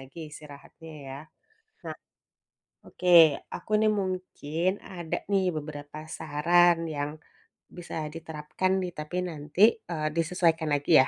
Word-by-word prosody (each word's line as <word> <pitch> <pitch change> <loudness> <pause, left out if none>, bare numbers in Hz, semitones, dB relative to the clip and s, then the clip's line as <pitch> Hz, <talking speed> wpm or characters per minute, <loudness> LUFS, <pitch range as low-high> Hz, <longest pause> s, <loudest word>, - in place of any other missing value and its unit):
lagi 135 +4 -13
istirahatnya, 150 +2 -12 0.2
ya. 135 +1 -6 0.7
Nah - - -5 0.9
oke, 180 - -6 0.5
aku 180 - -10
nih 215 0 +4
mungkin 180 -3 -2 0.2
ada 175 -3 -3
nih, 195 -1 +3
beberapa 145 -1 -7 0.2
saran 170 +3 +4 0.2
yang 145 0 -2 0.7
bisa 175 - -7 0.2
diterapkan 160 +3 -2
nih, 180 - -3
tapi 150 +4 -4
nanti, 150 +2 -5 0.3
eee, 155 -2 -1
disesuaikan 165 -1 +2
lagi 145 +3 0
ya, 130 - +1
160 Hz, 120 wpm, -28 LUFS, 150-175 Hz, 0.9 s, nih